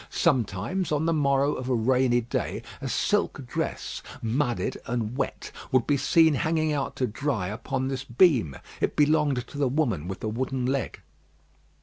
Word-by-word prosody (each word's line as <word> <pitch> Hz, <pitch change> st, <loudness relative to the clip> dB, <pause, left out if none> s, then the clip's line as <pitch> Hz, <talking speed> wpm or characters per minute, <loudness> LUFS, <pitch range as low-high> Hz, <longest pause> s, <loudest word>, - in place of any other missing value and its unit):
Sometimes 135 Hz, -, 0 dB
on 150 Hz, +1 st, +1 dB
the 165 Hz, -, +2 dB
morrow 140 Hz, -1 st, +2 dB
of 130 Hz, 0 st, -5 dB
a 125 Hz, -, +2 dB
rainy 125 Hz, +1 st, +3 dB
day, 120 Hz, -, -3 dB, 0.2 s
a -, -, -3 dB
silk -, -, 0 dB
dress, -, -, -3 dB, 0.2 s
mudded 120 Hz, +2 st, -1 dB
and 120 Hz, -1 st, -2 dB
wet, 140 Hz, -, -3 dB, 0.2 s
would 130 Hz, -3 st, +3 dB
be 145 Hz, -, +2 dB
seen 160 Hz, +3 st, +4 dB
hanging 155 Hz, +2 st, +1 dB
out 140 Hz, -2 st, -2 dB
to 130 Hz, -, 0 dB
dry 115 Hz, -5 st, -2 dB
upon 130 Hz, +5 st, -3 dB
this 135 Hz, -1 st, -3 dB
beam. 120 Hz, -, +3 dB, 0.2 s
It -, -, 0 dB
belonged 145 Hz, -4 st, +2 dB
to 145 Hz, -, -9 dB
the 140 Hz, -, +3 dB
woman 120 Hz, -, 0 dB
with 95 Hz, -, -6 dB
the -, -, -2 dB
wooden 125 Hz, +3 st, -2 dB
leg. 135 Hz, +1 st, -2 dB
130 Hz, 165 wpm, -26 LUFS, 120-145 Hz, 0.2 s, seen